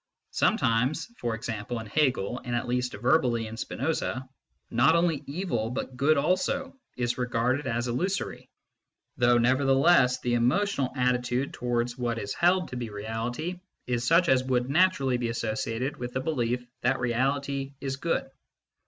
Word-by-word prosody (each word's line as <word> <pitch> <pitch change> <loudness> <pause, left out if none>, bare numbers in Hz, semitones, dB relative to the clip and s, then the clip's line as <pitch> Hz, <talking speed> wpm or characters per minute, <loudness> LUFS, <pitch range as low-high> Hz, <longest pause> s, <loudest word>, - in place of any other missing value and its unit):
Sometimes 125 +8 +1
for 120 -1 -1
example 115 +1 -4
in 110 - -7
Hegel, 125 -2 0
and 120 -1 -2
at 120 +1 -2
least 125 0 -1
verbally 125 -4 +2
in 110 +1 -7
Spinoza 130 +1 -2 0.4
not 125 +8 +4
only 170 -4 +1
evil, 140 - -2
but 125 +1 -4
good 140 +4 +3
also, 185 - 0 0.2
is 120 0 -1
regarded 125 +3 0
as 120 -1 -1
illusory, 175 +11 -2 0.7
though 120 0 +4
nevertheless 130 +2 +4
the 120 - -1
emotional 130 +4 +1
attitude 125 0 0
towards 120 0 -2
what 120 -1 -1
is 135 +3 -3
held 180 +1 +2
to 125 - -5
be 120 -2 -4
Reality 115 - -4 0.3
is 120 -1 -1
such 170 +6 +4
as 130 -1 +4
would 125 0 0
naturally 145 -7 +3
be 120 -1 -2
associated 115 +3 -2
with 120 0 -5
the - - 0
belief 125 -4 -1 0.2
that 130 +2 +1
Reality 135 +3 -1
is 135 -1 -3
good. 165 -1 -1
125 Hz, 150 wpm, -27 LUFS, 120-140 Hz, 0.7 s, not